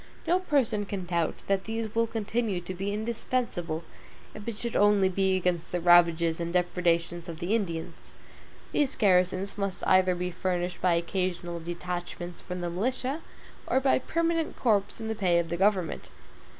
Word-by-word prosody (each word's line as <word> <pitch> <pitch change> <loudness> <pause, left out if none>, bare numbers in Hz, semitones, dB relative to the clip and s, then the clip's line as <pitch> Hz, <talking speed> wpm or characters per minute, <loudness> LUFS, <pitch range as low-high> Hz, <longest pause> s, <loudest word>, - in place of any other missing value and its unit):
No 360 +2 +3
person 260 - +1
can 195 -3 -4
doubt 170 -2 -1
that 195 -1 0
these 225 -1 -3
will 230 0 +2
continue 220 -2 -1
to 175 +1 -6
be 195 +2 -3
indispensable, 215 -6 -2 0.5
if 215 0 -10
it 230 -3 -3
should 235 +1 -4
only 205 -2 +4
be 190 0 +2
against 180 -2 -1
the 180 - 0
ravages 170 -1 +5
and 170 0 -2
depredations 175 -1 0
of 165 - -6
the 175 +5 -1
Indians. 170 -8 -3 0.6
These 285 -1 +1
garrisons 190 -1 +2
must 195 -2 -2
either 185 -1 +4
be 180 +1 -3
furnished 180 0 -2
by 180 -2 +3
occasional 175 0 -2
detachments 175 +1 -5
from 180 -1 -6
the 175 - -2
militia, 255 - -2 0.5
or 260 - +3
by 265 -1 +3
permanent 330 +3 -1
corps 205 -4 +1
in 225 - -5
the 220 - -1
pay 185 -5 +2
of 170 -1 0
the 170 - -2
government. 190 -3 +1
185 Hz, 165 wpm, -28 LUFS, 175-220 Hz, 0.6 s, ravages